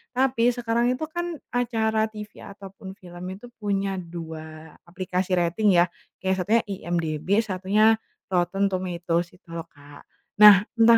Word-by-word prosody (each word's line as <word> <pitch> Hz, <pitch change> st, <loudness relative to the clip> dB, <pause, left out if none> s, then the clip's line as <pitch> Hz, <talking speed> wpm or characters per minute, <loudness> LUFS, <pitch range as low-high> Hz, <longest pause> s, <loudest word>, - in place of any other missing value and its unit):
tapi 250 Hz, -2 st, +3 dB
sekarang 235 Hz, +1 st, +1 dB
itu 260 Hz, -, -6 dB
kan, 345 Hz, 0 st, -3 dB, 0.2 s
acara 220 Hz, -3 st, +1 dB
TV 210 Hz, -1 st, -9 dB
ataupun 195 Hz, -1 st, -10 dB
film 175 Hz, -2 st, -11 dB
itu 205 Hz, -, -13 dB
punya 195 Hz, -2 st, -1 dB
2 160 Hz, -2 st, -9 dB
aplikasi 185 Hz, +1 st, -2 dB
rating, 180 Hz, +4 st, +2 dB
ya. 175 Hz, 0 st, +6 dB, 0.4 s
Kayak, 190 Hz, 0 st, +2 dB
satunya 230 Hz, +2 st, +4 dB
IMDb, 165 Hz, -4 st, -3 dB, 0.2 s
satunya 210 Hz, +2 st, +2 dB, 0.3 s
Rotten 180 Hz, +2 st, +1 dB
Tomatoes 175 Hz, -2 st, -1 dB
itu 190 Hz, -, -46 dB
lo, 165 Hz, 0 st, -5 dB
Kak. 145 Hz, 0 st, -15 dB, 0.4 s
Nah, 210 Hz, -1 st, +10 dB
entah 230 Hz, 0 st, +8 dB
190 Hz, 135 wpm, -25 LUFS, 175-220 Hz, 0.4 s, Nah